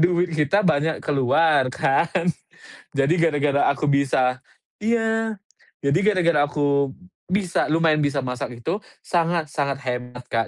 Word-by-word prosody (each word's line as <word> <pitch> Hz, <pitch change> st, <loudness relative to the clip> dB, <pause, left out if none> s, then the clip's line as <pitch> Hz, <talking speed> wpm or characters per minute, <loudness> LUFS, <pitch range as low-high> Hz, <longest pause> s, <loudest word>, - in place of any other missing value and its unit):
duit 175 Hz, +1 st, +2 dB
kita 155 Hz, +4 st, +1 dB
banyak 160 Hz, -4 st, +1 dB
keluar, 140 Hz, 0 st, +2 dB
kan. 170 Hz, +7 st, +1 dB, 0.7 s
Jadi 140 Hz, +4 st, +2 dB
gara-gara 145 Hz, -3 st, +2 dB
aku 145 Hz, +1 st, +1 dB
bisa 130 Hz, -2 st, +1 dB, 0.4 s
iya. 225 Hz, 0 st, 0 dB, 0.5 s
Jadi 140 Hz, +5 st, +2 dB
gara-gara 170 Hz, -8 st, +3 dB
aku 140 Hz, -2 st, 0 dB, 0.3 s
bisa 185 Hz, 0 st, 0 dB
lumayan 160 Hz, 0 st, +2 dB
bisa 145 Hz, -2 st, 0 dB
masak 125 Hz, -1 st, -5 dB
itu, 175 Hz, -, -1 dB, 0.2 s
sangat-sangat 160 Hz, -5 st, -1 dB
hemat, 125 Hz, 0 st, -5 dB
Kak, 115 Hz, -1 st, 0 dB
150 Hz, 120 wpm, -22 LUFS, 140-170 Hz, 0.7 s, gara-gara